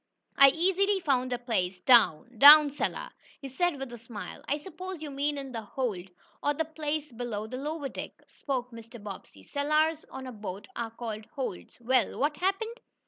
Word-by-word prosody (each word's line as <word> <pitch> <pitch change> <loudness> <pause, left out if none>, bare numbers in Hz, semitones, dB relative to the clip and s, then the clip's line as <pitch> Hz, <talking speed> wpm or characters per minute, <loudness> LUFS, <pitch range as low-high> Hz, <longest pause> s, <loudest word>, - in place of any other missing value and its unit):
I 275 0 +9
easily 385 +6 +2
found 255 -6 0
a 245 - 0
place 205 -7 -1
down 235 - +4
down 295 0 +10
cellar," 290 - -3 0.3
he 275 - -7
said 345 +5 0
with 270 -3 -6
a 240 - -8
smile. 230 -3 -9
"I 290 - +1
suppose 370 +3 -8
you 295 - -6
mean 285 +1 -1
in 275 -1 -6
the 230 -2 -4
hold, 205 -5 -4 0.3
or 290 0 +1
the 320 - -1
place 305 -1 -4
below 230 -3 -4
the 255 +4 -6
lower 295 +1 -3
deck," - - -7
spoke 255 -3 -4
Mr. 230 0 -11
Bobbsey. 195 - -10
"Cellars 305 - +1
on 265 0 -8
a 255 - -6
boat 205 -3 -7
are 230 -1 -3
called 225 -2 -6
'holds.' 255 -8 -5
Well, 245 +1 +1
what 295 +1 0
happened?" 440 +7 -1
270 Hz, 185 wpm, -29 LUFS, 230-305 Hz, 0.3 s, down